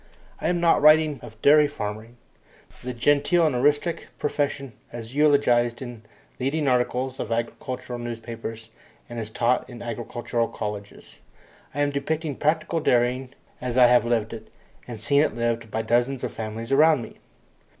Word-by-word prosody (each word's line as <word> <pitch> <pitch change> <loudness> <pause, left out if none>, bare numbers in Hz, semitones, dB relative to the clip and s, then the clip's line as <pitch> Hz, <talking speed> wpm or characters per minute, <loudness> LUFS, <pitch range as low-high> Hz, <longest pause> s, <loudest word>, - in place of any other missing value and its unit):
I - - 0
am 175 -1 +1
not 170 -1 +4
writing 155 -2 +5
of 110 -1 -12
dairy 150 +1 +7
farming, 115 -3 -6 0.7
the 125 - -3
genteel 145 +7 +3
and 150 -5 +1
artistic 145 +6 +1
profession 140 -3 -2 0.2
as 115 0 -8
eulogized 135 -5 +3
in 120 -4 -8 0.4
leading 140 +3 0
articles 130 +1 0
of 115 - -4
agricultural 120 +1 -4
newspapers 115 -1 -7 0.4
and 120 -1 -6
as 110 -2 -5
taught 120 +3 0
in 120 -2 -9
agricultural 120 0 -2
colleges. 105 -1 -7 0.6
I 145 - 0
am 145 0 +2
depicting 150 +1 -2
practical 160 +2 0
dairying 125 -1 +1 0.3
as 125 0 -3
I 125 - +8
have 120 0 +5
lived 115 -2 0
it, 110 -1 -9 0.4
and 120 -3 -7
seen 140 +6 +3
it 155 - 0
lived, 115 -1 -1
by 110 +1 -2
dozens 120 +3 +1
of - - -3
families 110 +2 -6
around 150 -1 +5
me. - - -11
125 Hz, 155 wpm, -25 LUFS, 115-145 Hz, 0.7 s, I